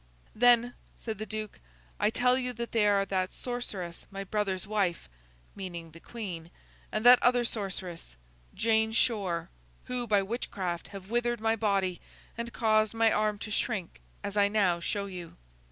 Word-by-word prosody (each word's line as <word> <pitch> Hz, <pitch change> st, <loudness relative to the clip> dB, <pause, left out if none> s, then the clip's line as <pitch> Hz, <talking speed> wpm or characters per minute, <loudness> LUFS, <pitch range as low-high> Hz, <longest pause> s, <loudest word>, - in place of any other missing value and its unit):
'Then,' 245 Hz, +1 st, +5 dB, 0.2 s
said 220 Hz, -3 st, -5 dB
the 215 Hz, -, -4 dB
Duke, 215 Hz, -1 st, -5 dB, 0.4 s
'I -, -, +3 dB
tell 250 Hz, +3 st, +3 dB
you 250 Hz, -1 st, -1 dB
that 235 Hz, 0 st, -5 dB
they 215 Hz, -2 st, +3 dB
are 200 Hz, -1 st, +3 dB
that 185 Hz, -1 st, -1 dB
sorceress 200 Hz, -9 st, -5 dB
my 195 Hz, 0 st, -5 dB
brother's 195 Hz, -2 st, -1 dB
wife;' 200 Hz, -, 0 dB, 0.5 s
meaning 170 Hz, -4 st, -6 dB
the 165 Hz, -, -12 dB
Queen: 180 Hz, -7 st, -6 dB, 0.4 s
'and 215 Hz, +2 st, -2 dB
that 245 Hz, 0 st, +9 dB
other 245 Hz, -1 st, +4 dB
sorceress, 190 Hz, -, -5 dB, 0.4 s
Jane 220 Hz, 0 st, +2 dB
Shore. 195 Hz, -8 st, +1 dB, 0.3 s
Who, 250 Hz, -1 st, -3 dB
by 205 Hz, -2 st, +3 dB
witchcraft, 190 Hz, -5 st, -3 dB
have 195 Hz, 0 st, -10 dB
withered 240 Hz, 0 st, +1 dB
my 225 Hz, +1 st, +2 dB
body, 195 Hz, -5 st, 0 dB, 0.3 s
and 235 Hz, +1 st, -4 dB
caused 215 Hz, -1 st, +2 dB
my 225 Hz, 0 st, +4 dB
arm 210 Hz, 0 st, +1 dB
to 210 Hz, -, -6 dB
shrink 210 Hz, -5 st, -2 dB, 0.2 s
as 200 Hz, 0 st, -4 dB
I 205 Hz, -1 st, +5 dB
now 200 Hz, -5 st, +2 dB
show 200 Hz, +4 st, -2 dB
you. 180 Hz, -4 st, -8 dB
210 Hz, 160 wpm, -30 LUFS, 190-230 Hz, 0.5 s, that